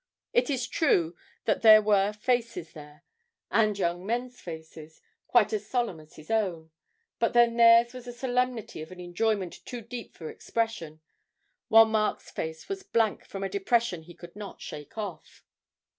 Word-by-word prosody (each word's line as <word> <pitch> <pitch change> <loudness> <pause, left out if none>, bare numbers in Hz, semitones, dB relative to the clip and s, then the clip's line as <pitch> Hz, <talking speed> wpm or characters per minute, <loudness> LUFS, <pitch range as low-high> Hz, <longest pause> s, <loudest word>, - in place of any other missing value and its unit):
It 485 -8 +3
is 255 -4 -1
true 180 - +2 0.3
that 215 - +1
there 215 -1 +9
were 205 -1 +3
faces 225 -5 -2
there 150 +1 -13 0.5
and 215 0 +3
young 175 -1 -1
men's 245 +4 -3
faces 160 -1 -10 0.3
quite - - +3
as 425 - -2
solemn 240 -10 -1
as 155 0 -17
his 155 +4 -10
own, 180 -8 -1 0.5
but - - +1
then 240 -1 +5
theirs 235 +1 +6
was 250 -1 -9
the 245 - -6
solemnity 245 -5 -2
of 160 - -9
an 185 - -11
enjoyment 185 +1 -2
too 245 -2 -7
deep 235 +1 -8
for 160 - -8
expression, 170 -8 -3 0.7
while 225 0 +8
Mark's 220 -1 -1
face 160 0 -5
was 390 -1 -4
blank 230 - 0
from 195 0 -6
a - - 0
depression 200 -1 0
he 170 +1 -14
could 175 0 -13
not 205 -1 -8
shake 150 +7 -9
off. 195 -7 -7
215 Hz, 165 wpm, -28 LUFS, 170-235 Hz, 0.7 s, there